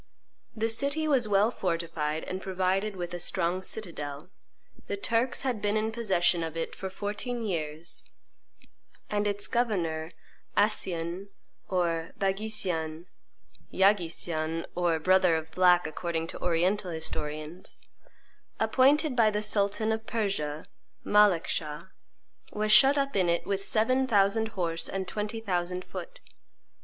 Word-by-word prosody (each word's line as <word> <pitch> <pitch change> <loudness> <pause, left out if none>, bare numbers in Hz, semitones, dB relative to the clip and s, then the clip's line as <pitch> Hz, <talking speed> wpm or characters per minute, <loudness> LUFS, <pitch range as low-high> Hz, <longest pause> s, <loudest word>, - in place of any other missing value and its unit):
The 225 0 0
city 280 +7 0
was 265 -6 +3
well 205 +2 +3
fortified 165 -5 -2
and 185 +1 -5
provided 190 +2 0
with 175 -1 -5
a 175 - -4
strong 180 +1 0
citadel; 170 -6 -5 0.6
the 200 - -2
Turks 230 +6 0
had 250 -6 -1
been 210 +1 +1
in 220 +1 0
possession 190 -6 +1
of 165 0 -4
it 165 - -3
for 190 - -5
fourteen 210 +5 -4
years; 160 -4 -4 1.1
and 210 0 +1
its 205 0 0
governor 170 -10 -1 0.5
Accien 185 -3 0 0.4
or 170 -3 0
Baghisian 190 -5 -1 0.7
(Yagui 190 -3 +3
Sian, 165 -1 -3
or 175 -2 +1
brother 185 +1 +4
of 160 0 -4
black, 180 -1 +4
according 165 +1 -2
to - - -8
Oriental 180 +3 +1
historians), 160 +1 -5 0.8
appointed 265 +6 +3
by 225 -3 +5
the 210 0 -1
sultan 210 +1 +1
of 220 0 -3
Persia, 160 -9 -2 0.4
Malekschah, 175 -4 +2 0.6
was 215 0 0
shut 275 +5 +7
up 275 0 0
in 185 -3 +3
it 170 - +1
with 195 -1 -1
seven 255 +6 +2
thousand 210 0 +3
horse 165 -2 -1
and 190 -1 -3
twenty 210 +3 -3
thousand 180 -3 -2
foot. - - -8
190 Hz, 130 wpm, -28 LUFS, 170-215 Hz, 1.1 s, shut